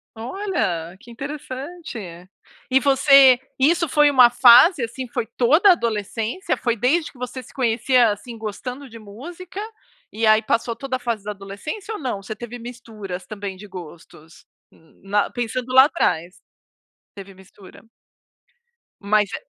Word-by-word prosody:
Olha, 220 - -3
que 240 +1 -15
interessante. 280 +3 -7 0.7
E 265 - +5
você 275 -2 +6 0.2
isso 335 +5 +3
foi 295 +1 +4
uma 255 -4 +6
fase, 245 +5 +6
assim, 250 +3 -5
foi 230 - -4
toda 310 - +4
a - - +10
adolescência, 230 - -3
foi 235 -2 -1
desde 285 +9 0
que - - -21
você 250 +1 -6
se - - -17
conhecia, 240 0 +2
assim, 230 +3 -8
gostando 250 +5 -7
de 230 - -11
música, 330 - -10 0.5
e 225 +1 -2
aí 215 0 +5
passou 230 +1 -1
toda 270 0 -4
a - - -4
fase 235 -4 -3
da 210 - -4
adolescência 205 - -7
ou 425 - -6
não? 250 -8 -4
Você 215 - -6
teve 240 +2 -8
misturas 225 -6 -9
também 200 -3 -6
de 210 +2 -12
gostos? 165 -3 -13 0.3
Hum. 160 - -26 0.3
Pensando 245 +1 -4
lá 260 +1 +8
atrás. 180 - -1 0.8
Teve 195 -1 -11
mistura. 190 0 -17 1.2
Mas 210 0 +1
é - - -7
240 Hz, 145 wpm, -21 LUFS, 210-275 Hz, 1.2 s, a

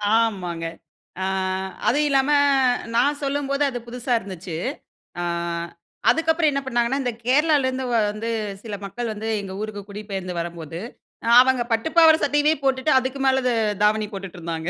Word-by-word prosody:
ஆமாங்க. 180 -7 0 0.6
அ - - 0 0.6
அதுவும் 295 +3 +3
இல்லாம, 275 +1 +2 0.6
நான் 285 +5 +2
சொல்லும்போது 280 0 0
அது 245 -2 -4
புதுசா 245 +1 -3
இருந்துச்சு. 185 -4 -7 0.7
அ - - -2 0.9
அதுக்கப்புறம் 320 -1 +3
என்ன 275 0 -1
பண்ணாங்கன்னா, 240 +1 0
இந்த 245 - 0
கேரளாலருந்து 265 -1 +2 0.3
வந்து 220 +2 -5 0.3
சில 215 -3 -5
மக்கள் 230 +3 -4
வந்து, 215 +1 -6
எங்க 195 -1 -7
ஊருக்கு 215 -1 -5
குடிபெயர்ந்து 200 -3 -5
வரம்போது, 170 -1 -6 0.6
அவங்க 260 -1 +2
பட்டு 225 +6 +1
பாவாடை, 320 -1 +8
சட்டையவே 290 +1 +3
போட்டுட்டு, 270 +2 +1
அதுக்கு 260 +1 -4
மேல 265 0 +3
த - - +3 0.3
தாவணி 215 0 +2
போட்டுட்டு 195 -2 -7
இருந்தாங்க. 165 0 -4
240 Hz, 140 wpm, -23 LUFS, 200-275 Hz, 0.9 s, பாவாடை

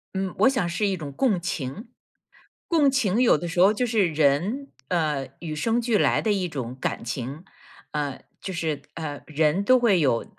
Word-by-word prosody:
嗯， 190 -1 -2
我 265 - +6
想 235 -10 0
是 190 +4 0
一 190 - -1
种 150 -4 -6
共 205 - +1
情， 170 - -4 0.8
共 305 -5 +4
情 240 -4 +1
有 235 - +5
的 175 - -5
时 175 +1 -3
候 195 +3 +7
就 250 - 0
是 220 -6 +2
人， 160 - +1 0.2
呃， 150 -6 0
与 160 -3 -5
生 225 +10 +1
俱 235 -2 +1
来 - - +3
的 215 - +1
一 190 -3 -1
种 130 -5 -5
感 - - -2
情， 130 +7 -5 0.5
啊， 145 -3 -3 0.2
就 190 - -5
是 160 -5 -2
啊， 150 -3 -5
人 155 +4 +1
都 255 +5 +5
会 210 -7 +4
有， 130 -7 +1
175 Hz, 200 characters per minute, -25 LUFS, 150-220 Hz, 0.8 s, 候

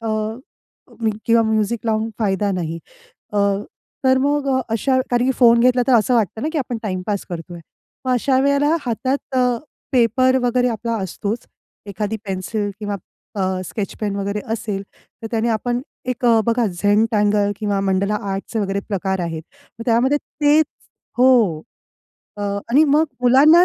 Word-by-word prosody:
अ, 225 - -4 1.2
किंवा 230 0 +5
म्युझिक 220 +1 +1
लावून 220 0 0
फायदा 205 -1 +1
नाही 165 -2 -3 0.5
अ, 210 - -3 0.7
तर 260 0 +5
मग 285 0 +1
अ, - - +2
अशा 260 +3 +2
कारण 245 0 +2
की 265 - +2
फोन 235 -2 +6
घेतला 250 0 +4
तर 260 - +4
असं 235 +3 +2
वाटतं 220 0 0
ना, 310 - 0
की 315 - 0
आपण 245 -3 -3
टाईम 185 -4 -2
पास 205 -2 -2
करतोय. 175 0 -7 0.4
मग 255 - +1
अशा 260 +2 +2
वेळेला 280 +3 +3
हातात 260 +3 -2
अ, 250 -1 +4 0.5
पेपर 255 +2 +3
वगैरे 245 0 +2
आपला 230 0 -2
असतोच, 205 +5 -4 0.4
एखादी 205 +2 -3
पेन्सिल 200 +2 -2
किंवा 205 -1 -3 0.4
अ, 195 - 0 0.2
स्केच 200 +2 -4
पेन 205 -2 -1
वगैरे 200 +1 -2
असेल 210 -3 -3 0.4
तर - - -4
त्याने 230 0 0
आपण 240 +2 0 0.3
एक 250 0 -3 0.2
बघा 230 0 +2
झेंटँगल 205 +2 +2
किंवा 205 -2 -1
मंडला 195 +2 +1 0.2
आर्ट 195 0 -2
चे 225 - -1
वगैरे 200 -1 -1
प्रकार 190 -2 -1
आहेत. 165 -2 -3 0.4
मग 230 - -6
त्यामध्ये 245 +5 +3
तेच 295 +1 +2 0.5
हो, 235 -11 +4 0.8
अ, - - -8 0.3
आणि 295 +5 +6
मग 300 +2 +4 0.2
मुलांना 295 +8 +7
225 Hz, 155 wpm, -20 LUFS, 200-255 Hz, 1.2 s, मुलांना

